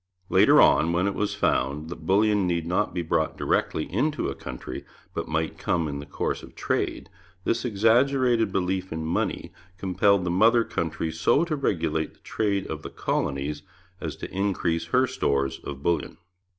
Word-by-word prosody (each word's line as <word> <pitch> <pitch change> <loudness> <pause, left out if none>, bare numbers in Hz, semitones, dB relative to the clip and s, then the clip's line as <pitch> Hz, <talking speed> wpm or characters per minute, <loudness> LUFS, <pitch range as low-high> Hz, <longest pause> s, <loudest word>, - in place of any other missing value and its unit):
Later - - +6
on, 85 +2 +5
when 90 +2 +2
it 100 - 0
was 105 +1 -1
found 70 +4 0
that 80 -2 -8
bullion 105 0 +3
need 85 -2 0
not 90 +1 0
be 90 -1 -2
brought 80 -1 0
directly 75 - 0
into 145 - -1
a - - -3
country, 65 -2 -7 0.3
but - - -3
might 80 0 -2
come 85 -3 0
in 70 -1 -4
the 70 - -9
course - - -2
of - - -13
trade, - - -2 0.4
this 115 +4 0
exaggerated 120 +1 +3
belief 95 0 -1
in 80 0 -3
money 80 - -2 0.2
compelled 95 +1 +2
the 90 - -1
mother 115 +6 +5
country 80 -4 -3
so 110 - +2
to 160 -3 -1
regulate 80 - -1
the - - -29
trade 100 -3 -1
of - - -5
the - - -7
colonies 70 +2 -2 0.4
as - - -4
to - - -8
increase 90 -4 0
her 125 +10 +3
stores 70 - -1
of 70 -1 -7
bullion. 85 -3 0
90 Hz, 175 wpm, -26 LUFS, 80-105 Hz, 0.4 s, Later